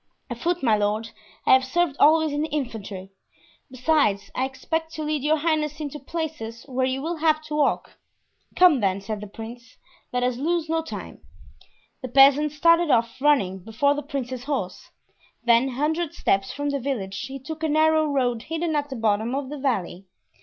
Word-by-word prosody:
"Afoot, 335 +8 -2
my 225 -4 +4
lord; 210 +2 -1 0.3
I - - +6
have 260 0 +6
served 285 +3 0
always 315 +1 +5
in 290 - -1
the 310 - -1
infantry. 215 -9 -5 0.6
Besides, 250 -7 +1
I 260 - 0
expect 320 +4 -3
to 310 - -4
lead 300 -1 -1
your 305 +3 +2
highness 305 -1 -1
into 295 -1 -5
places 275 -7 -5
where 260 -1 0
you 265 +1 -2
will 335 +2 -2
have 310 -1 +2
to 305 -1 -5
walk." 295 -2 0 0.6
"Come, 355 -7 +6
then," 195 -2 +1
said 210 +1 -5
the 210 - -7
prince; 230 +3 -10 0.3
"let 250 0 0
us 250 -1 0
lose 325 +4 0
no 325 +1 0
time." 320 - -8 0.8
The 255 - -4
peasant 275 +3 +5
started 335 +3 +4
off, 235 0 +1
running 215 -11 +2
before 225 +9 +1
the 290 - -3
prince's 260 -4 -5
horse; 270 -11 -4 0.5
then, 235 +2 +4
a - - -6
hundred 305 +4 -1
steps 195 0 +1
from 285 0 -2
the 280 - -1
village, 200 -8 -3
he 270 +1 -6
took 310 +4 -8
a 320 - 0
narrow 315 +1 +3
road 250 -5 0
hidden 325 +3 -2
at 290 -1 -1
the 265 - -5
bottom 220 +1 0
of 275 -1 -3
the 295 0 -6
valley. 195 -8 -2
275 Hz, 185 wpm, -24 LUFS, 230-310 Hz, 0.8 s, I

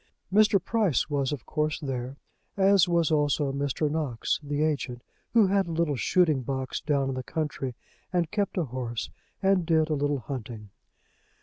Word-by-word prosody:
Mr. 210 -1 +5
Price 190 - 0
was 140 -2 0
of 145 -5 -5
course 155 0 -1
there, 135 -2 -4 0.4
as 195 -2 +5
was 170 -2 +2
also 145 -2 +1
Mr. 140 +2 -1
Knox, 145 -6 -1
the 145 0 -1
agent, 135 -5 -2 0.3
who 225 -3 +6
had 195 -1 +2
a - - -4
little 160 -3 0
shooting 155 0 +2
box 130 +1 -3
down 140 -3 0
in - - -1
the 130 - -3
country, 135 -3 -3 0.4
and 175 -3 0
kept 205 -1 -1
a 175 - +2
horse, 120 -4 -4 0.3
and 190 -2 +3
did 160 -1 +2
a - - +3
little 145 -2 0
hunting. 110 -5 -7
150 Hz, 170 wpm, -27 LUFS, 135-170 Hz, 0.4 s, who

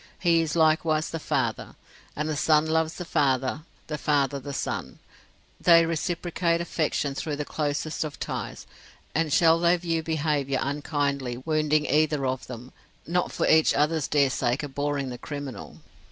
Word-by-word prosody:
He 170 -2 +3
is 160 -1 -2
likewise 160 -1 +2
the 165 - -3
Father. - - -2 0.4
And 150 +1 -2
the 155 - -1
son 155 +1 +3
loves 160 0 0
the 180 - -6
father, 135 -2 +1 0.2
the 150 -1 -5
father 140 -2 +1
the 140 +2 -7
son; - - -4 0.6
they 170 -1 +6
reciprocate 170 +1 -1
affection 155 -4 -1
through 150 +2 -3
the 150 0 -4
closest 150 +1 -2
of 150 -3 -7
ties; - - -5 0.5
and 160 -1 0
shall 165 +2 +5
they 175 +1 +4
view 165 -2 -1
behaviour 150 -4 0
unkindly 140 -3 -2
wounding 155 -1 +1
either 150 -1 +2
of 130 0 -2
them, 125 0 -9 0.3
not 175 +2 0
for - - -1
each 160 0 +4
other's 150 0 +1
dear 140 -3 +3
sake 125 +2 0
abhorring 145 -1 -2
the 125 -1 -7
criminal? 145 -5 -7
150 Hz, 155 wpm, -26 LUFS, 140-160 Hz, 0.6 s, they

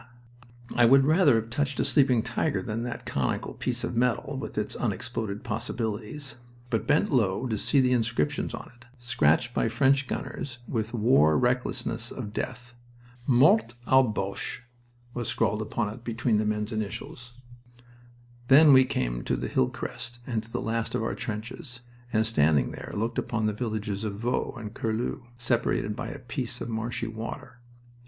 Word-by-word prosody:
I 120 - +6
would 135 +2 +6
rather 155 -3 +5
have 115 0 -1
touched 140 +2 0
a - - +2
sleeping 130 -6 +4
tiger 150 +4 -1
than 115 -2 -3
that 120 0 -5
conical - - -1
piece - - -2
of - - -3
metal 120 0 +1
with - - -6
its - - -1
unexploded 100 - -3
possibilities, 115 +4 -4 0.3
but 115 - 0
bent 150 +2 +3
low 115 -3 +2
to 115 -3 -1
see 140 +7 +2
the 130 -1 +3
inscriptions 115 -11 0
on - - -10
it, 120 0 -20
scratched 120 -2 +2
by 115 - +1
French 135 +4 +3
gunners 125 0 -4
with 115 -1 -2
wore 105 - +4
recklessness 125 -2 -1
of 105 -5 -6
death. 125 +2 -5 0.5
Mort 120 -3 +5
aux 130 +1 +6
Boches 100 -1 -2 0.5
was 120 -2 -3
scrawled 105 - +1
upon 110 +1 -1
it 115 - -13
between 115 -2 +1
the 105 - 0
men's 105 +1 -1
initials. 115 +3 -5 1.1
Then 145 +2 +8
we 130 0 +7
came - - -2
to - - +1
the - - -3
hill 65 - +2
crest 120 +1 -6
and 115 -4 -1
to 115 +1 -10
the - - -2
last 115 0 -1
of - - 0
our 115 - -1
trenches, 120 +4 -6 0.3
and, 110 -1 +2
standing 75 - +3
there, - - -8
looked 115 +3 -2
down - - 0
upon 115 -2 -1
the 105 - +1
villages 105 -2 -3
of 105 -2 -3
Vaux 120 +4 -2
and 105 -2 -7
Curlu, 115 +3 -2
separated 120 -3 0
by - - -4
a - - -6
piece 125 -1 -4
of 115 - -5
marshy 115 +1 -2
water. 115 +2 -7
115 Hz, 170 wpm, -27 LUFS, 110-125 Hz, 1.1 s, Then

